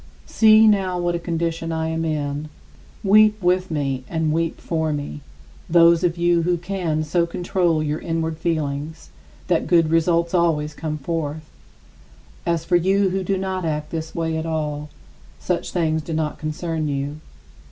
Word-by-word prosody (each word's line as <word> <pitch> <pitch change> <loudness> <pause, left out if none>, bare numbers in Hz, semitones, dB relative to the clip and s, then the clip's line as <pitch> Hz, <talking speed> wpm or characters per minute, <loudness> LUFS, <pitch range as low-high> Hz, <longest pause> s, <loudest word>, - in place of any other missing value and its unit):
See 220 0 +6
now 190 -4 +2
what 175 0 0
a 170 - -1
condition 165 -1 -2
I 160 0 -1
am 160 0 -2
in! 150 -1 -2 0.5
Weep 215 +1 +5
with 185 0 +1
me, 135 -4 -2
and 160 -2 0
weep 165 0 -1
for 160 -2 -1
me, 145 0 -4 0.5
those 170 0 +5
of 175 -1 +1
you 170 0 +3
who 175 +1 +1
can 170 -4 -2
so 170 +2 +1
control 175 -2 0
your 150 +1 -2
inward 165 -1 -2
feelings 155 -1 -3 0.3
that 175 -3 0
good 165 -3 +3
results 170 +1 +2
always 160 -4 +1
come 155 -1 -4
forth. 155 0 -4 1.0
As 170 -1 0
for 175 +1 +3
you 190 +2 +2
who 190 0 -1
do 195 +1 0
not 190 -1 -3
act 150 -2 -3
this 160 -1 -5
way 160 -1 -1
at 160 - -3
all, 150 -2 -3 0.5
such - - -2
things 160 -2 0
do 160 +2 -6
not 155 -1 -2
concern 155 0 -3
you. 140 +1 -3
165 Hz, 165 wpm, -22 LUFS, 155-175 Hz, 1.0 s, See